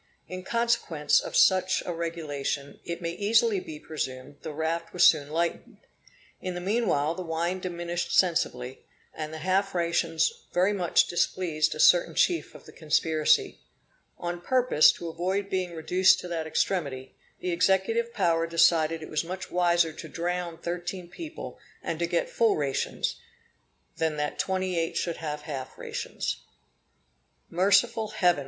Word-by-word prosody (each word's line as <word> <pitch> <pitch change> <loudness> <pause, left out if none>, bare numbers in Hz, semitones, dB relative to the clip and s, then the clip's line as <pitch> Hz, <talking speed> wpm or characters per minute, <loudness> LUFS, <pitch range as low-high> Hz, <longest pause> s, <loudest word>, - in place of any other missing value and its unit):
In 185 0 -6
consequence 230 -9 +1
of - - -6
such 185 0 +4
a 175 - -3
regulation, 150 -4 -4
it 170 +1 -5
may 170 - -1
easily 215 +3 +2
be 155 -4 -9
presumed 140 -3 -5
the 160 - -6
raft 165 +2 -3
was 180 - +5
soon 145 -3 +3
lightened. 170 +2 -2 0.6
In 185 -1 -4
the - - -3
meanwhile 180 -6 +1
the 185 - -6
wine 170 +2 -2
diminished 175 -1 -3
sensibly, 130 -8 +1 0.3
and 155 -1 -5
the 160 - -6
half 195 +1 +1
rations 170 - +1 0.2
very 185 +3 +3
much 180 -4 +3
displeased 170 -3 0
a - - -9
certain - - +5
chief 345 -2 +1
of - - -13
the - - -12
conspiracy. 155 0 +1 0.6
On 175 0 -4
purpose 250 -8 +5
to 170 - -7
avoid 190 +4 -2
being 185 -2 -2
reduced 180 +4 +4
to - - -7
that 165 -2 -3
extremity, 140 -7 -1 0.3
the 180 - -2
executive 190 +6 +1
power 165 -6 +1
decided 165 -1 +3
it - - -7
was 155 - 0
much 185 +3 -6
wiser 175 -2 +2
to - - -9
drown 175 0 -3
thirteen 175 +1 -5
people, 320 - -8 0.2
and 165 - -3
to 170 - 0
get 170 0 0
full 230 -2 +2
rations, 140 -3 -2 0.8
than 160 -2 0
that 150 0 -3
twenty 185 -2 0
eight 165 0 -2
should 170 -2 -2
have 150 -2 -5
half 135 -4 -6
rations. - - -4 1.1
Merciful 200 +5 +3
Heaven! 180 -7 +2
170 Hz, 150 wpm, -27 LUFS, 160-185 Hz, 1.1 s, was